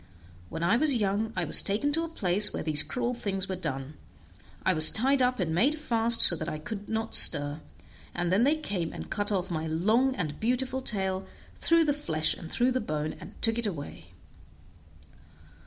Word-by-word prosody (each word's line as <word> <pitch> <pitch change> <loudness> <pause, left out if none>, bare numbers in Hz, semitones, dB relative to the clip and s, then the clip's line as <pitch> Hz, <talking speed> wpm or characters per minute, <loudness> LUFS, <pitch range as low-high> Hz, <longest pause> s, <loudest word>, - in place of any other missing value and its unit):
When 165 - -7
I 200 +7 +1
was 290 0 +1
young 210 0 -2
I - - -2
was - - +9
taken 215 +9 -2
to 330 +2 0
a - - -5
place 205 - +3
where - - -6
these 155 -2 +4
cruel 245 -1 -4
things 195 -5 -5
were 190 - -5
done; 145 -5 -6 0.7
I 190 - +2
was 155 -1 +8
tied 265 +4 -1
up, 250 -1 -1
and 165 -4 -3
made 270 - 0
fast 235 -5 +1
so 175 - +8
that 155 +1 -6
I 155 - -6
could 200 +6 -9
not 225 0 -5
stir, 145 0 +4 0.5
and 175 0 -3
then 200 +5 +1
they 290 +4 +1
came 200 - -5
and - - -10
cut 205 0 -1
off 190 -2 -3
my 160 -1 -4
long 220 +12 0
and 155 - -6
beautiful 255 +3 -3
tail, 190 -5 -2 0.3
through 335 -1 +1
the 290 - 0
flesh 160 - -1
and 165 - -12
through 250 +2 0
the 255 0 -2
bone, 155 -4 -5
and - - -14
took 225 +1 +3
it 235 - -2
away. 145 - -9
205 Hz, 200 wpm, -26 LUFS, 165-250 Hz, 0.7 s, was